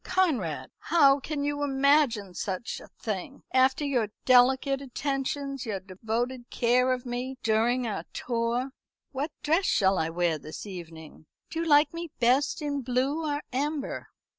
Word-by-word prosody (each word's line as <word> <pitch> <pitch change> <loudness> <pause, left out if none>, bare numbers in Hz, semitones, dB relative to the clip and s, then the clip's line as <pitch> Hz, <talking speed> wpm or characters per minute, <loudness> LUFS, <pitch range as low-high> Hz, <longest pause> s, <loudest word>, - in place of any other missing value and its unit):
"Conrad! 290 - 0
How 285 -4 +4
can 285 +1 -3
you 290 0 -1
imagine 270 -8 +2
such 190 +5 -4
a - - -13
thing? 220 +5 -6
after 260 +3 +3
your 250 -6 +1 0.2
delicate 265 +2 +4
attentions, 275 0 -3
your 210 -5 -3
devoted 230 +6 -4
care 250 +1 +2
of 255 0 -2
me 250 +2 -4
during 230 +3 +2
our 215 -3 -3
tour. 240 +2 -1 0.4
What 280 +3 -2
dress 325 +6 +2
shall 190 -1 +3
I 160 - 0
wear 165 -1 0
this 155 +7 -8
evening? 165 -5 -10 0.2
Do 325 - -3
you 335 - -1
like 295 +1 +5
me 335 0 -5
best 260 +5 +2
in 285 -1 -1
blue 265 +5 0
or 290 +1 -2
amber?" 285 +2 -2
255 Hz, 150 wpm, -28 LUFS, 225-285 Hz, 0.4 s, like